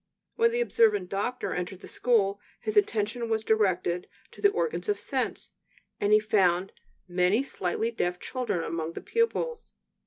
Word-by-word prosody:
When 460 0 +4
the 480 +1 0
observant 210 - +3
doctor 205 +6 -2
entered 180 +1 -4
the - - -10
school, 205 -5 +1 0.2
his 430 - -3
attention 230 - +1
was 220 -1 0
directed 185 -5 +1 0.2
to - - -14
the 405 - +6
organs 450 +1 -2
of 415 - +2
sense, - - -3 0.5
and 205 - +1
he 215 - +7
found 195 -4 +2 0.4
many 180 +7 +2
slightly 225 -2 -2
deaf 180 -6 -1
children 240 -9 -2
among 165 0 -3
the - - -6
pupils. 465 0 -1
215 Hz, 155 wpm, -28 LUFS, 180-255 Hz, 0.5 s, he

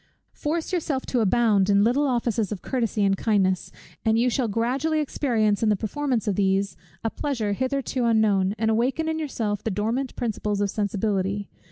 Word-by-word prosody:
Force 320 +4 -3
yourself 300 -6 -1
to 250 - 0
abound 210 -2 +3
in 200 0 +5
little 265 +6 +2
offices 235 -4 0
of 195 -4 -5
courtesy 230 -5 -1
and 195 -1 +3
kindness; 190 -3 +1 0.3
and 220 0 +3
you 245 +2 +2
shall 245 0 0
gradually 255 +9 0
experience 230 -8 +1
in 225 - +3
the 210 - +4
performance 235 +3 -2
of 205 - +2
these 195 0 +1 0.3
a 225 - -1
pleasure 230 -8 -2
hitherto 260 +1 -1
unknown, 210 -4 +2
and 220 +1 +1
awaken 260 +8 0
in 320 0 -1
yourself 220 -9 -2
the - - -1
dormant 225 +7 -2
principles 210 -3 -2
of 200 -1 0
sensibility. 200 -1 -1
225 Hz, 175 wpm, -25 LUFS, 205-260 Hz, 0.3 s, in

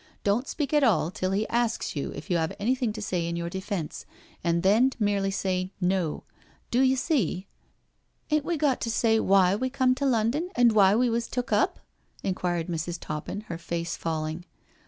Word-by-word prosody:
Don't 215 +6 +1
speak 295 -2 -3
at 295 -1 +4
all 180 - +3
till 185 0 -2
he 200 +3 0
asks 235 -5 0
you 145 - -3
if 155 +7 -7
you 175 - +3
have 160 -1 -1
anything 245 +1 +1
to 215 -1 -6
say 175 -4 -1
in 170 - -2
your 170 0 -3
defence, 190 -4 -4 0.4
and 170 0 +1
then 220 +7 +4
merely 205 -3 +1
say 185 -1 -1
* - - -41 0.2
No.' 160 -4 -3 0.5
Do 245 - +3
you 265 0 +4
see?'* 240 - 0 0.4
" - - -33
Ain't 305 -1 +3
we 340 +2 -1
got 285 -4 +1
to 230 - -1
say 225 0 +2
why 195 -2 +4
we 260 +5 -1
come 255 -1 +2
to 280 +2 -2
London 250 +8 +1
and 245 -1 +5
why 200 -2 +5
we 245 +1 +2
was 230 0 -1
took 250 0 -3
up?" - - +1 0.4
inquired 175 -3 -1
Mrs. 170 0 -3
Toppin, 155 +7 -5
her 170 -6 -7
face 170 0 -3
falling. 160 +1 -3
200 Hz, 200 wpm, -27 LUFS, 175-245 Hz, 0.5 s, and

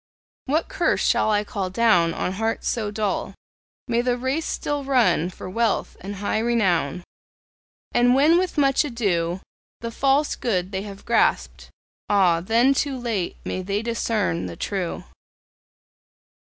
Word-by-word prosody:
What 305 +5 0
curse - - 0
shall - - +2
I 210 -1 +2
call 195 -2 -4
down 185 -5 +3
On - - -2
hearts 225 +4 -2
so 220 -3 -1
dull? 210 -1 -2 0.5
May 235 -1 +1
they 245 0 +1
the - - -3
race 260 +6 -2
still 290 -1 -2
run 225 - +2
For 185 - -9
wealth 225 +3 -1
and 200 +2 -6
high 205 +2 -1
renown! 185 -9 +1 0.9
And 245 +1 +4
when 310 +6 +5
with 370 -3 -2
much 275 0 +3
ado 190 - -1 0.4
The 230 0 -4
false 275 +4 +1
good 185 -6 -1
they 190 -1 -2
have 200 -1 -10
grasped 235 - +1 0.4
ah, 180 -5 +3
then 230 +8 +3
too 275 -1 -1
late! 230 -7 -2
May 185 - -3
they 200 +3 -2
discern 225 - -1
the 85 - -7
true! 185 - -3
220 Hz, 150 wpm, -23 LUFS, 185-245 Hz, 0.9 s, when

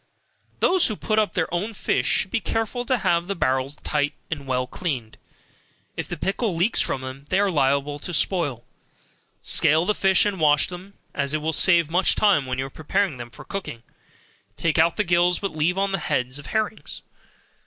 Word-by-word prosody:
Those 370 -1 +4
that 215 - -4
put 215 0 +1
up 215 - 0
their 170 -1 -1
own 205 +6 -2
fish - - 0
should 190 - +2
be - - +1
careful 225 +3 -2
to 255 +1 +1
have 170 -5 +1
the 200 - -2
barrels 130 -1 0
tight 145 -1 -1 0.2
and 140 -4 -4
well 125 -1 0
cleaned, 130 -8 -4 0.8
if - - -4
the - - -5
pickle 200 0 -1
leaks 180 +8 +2
from 135 - -1
them, 130 +2 -8
they 190 - +2
are 200 -1 +2
liable 140 -1 +1
to 180 - -6
spoil. 160 - 0 0.8
Scale 160 +3 +3
the 210 - +2
fish 195 -1 +3
and 200 -3 -1
wash 150 -2 +4
them, 185 +3 -10 0.2
as 140 +1 -1
it 155 - -2
will 160 +1 0
save 170 0 +4
much 180 +2 +3
time, 190 -11 +3
when 130 0 -3
you 135 +1 -2
prepare 160 +3 -1
them 120 -1 -8
for 145 +4 -13
cooking, 180 -12 -6 0.7
take 165 -1 +1
out 165 +1 +4
the 210 - +1
gills, 175 -1 +3
but 200 - -3
leave 165 +4 +1
on 195 0 +1
the 195 - -1
heads 125 -3 -2
of 145 - -11
herrings. 220 0 -3
170 Hz, 195 wpm, -23 LUFS, 140-195 Hz, 0.8 s, Those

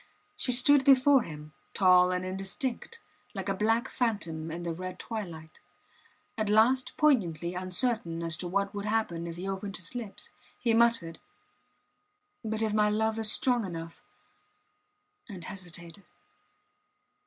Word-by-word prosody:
She 250 - +1
stood 265 +3 +6
before 270 0 +6
him, 150 -4 -9 0.2
tall 180 -2 +5
and 180 0 -2
indistinct, 195 - -4 0.4
like 195 0 -4
a 195 - +1
black 225 +5 +1
phantom 170 -10 -2
in 170 +2 -6
the 170 -1 -3
red 185 +2 -6
twilight. 170 -9 -7 0.8
At 215 -1 0
last 235 +5 +3
poignantly 175 - +2
uncertain 180 -2 -1
as 165 -1 -1
to 180 - -3
what 200 +2 -1
would 205 0 -5
happen 210 -6 -1
if 165 - -6
he 180 +3 -6
opened 195 +1 -4
his 180 +4 -5
lips, 245 +7 -6 0.3
he 235 -2 +1
muttered: 230 -8 +2 1.2
But 220 0 -1
if 215 -1 0
my 210 0 +3
love 220 +1 0
is 220 -1 +4
strong 245 -3 +1
enough... 165 -3 -7 1.3
and 185 -5 -8
hesitated. 175 +1 -8
200 Hz, 140 wpm, -29 LUFS, 175-230 Hz, 1.3 s, stood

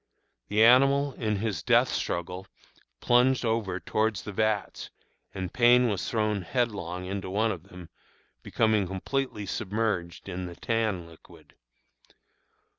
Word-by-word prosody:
The 105 +1 +3
animal, 135 +3 +5
in 110 -3 -2
his 100 -5 -2
death - - +3
struggle, 90 +3 -3 0.5
plunged 125 +1 +3
over 110 -5 -1
towards 110 0 -1
the 105 - -6
vats, 110 0 -1 0.4
and 95 -2 -5
Payne 125 0 +5
was 100 -3 -2
thrown 105 -3 0
headlong 90 -4 -2
into 95 0 -4
one 110 +4 +1
of 90 -3 -7
them, 90 -2 -11 0.5
being 110 -3 +1
completely 105 +4 -3
submerged 100 -4 -3
in 90 -1 -5
the 85 - -9
tan 110 -6 -1
liquid. 85 -1 -17
105 Hz, 125 wpm, -27 LUFS, 95-115 Hz, 0.5 s, animal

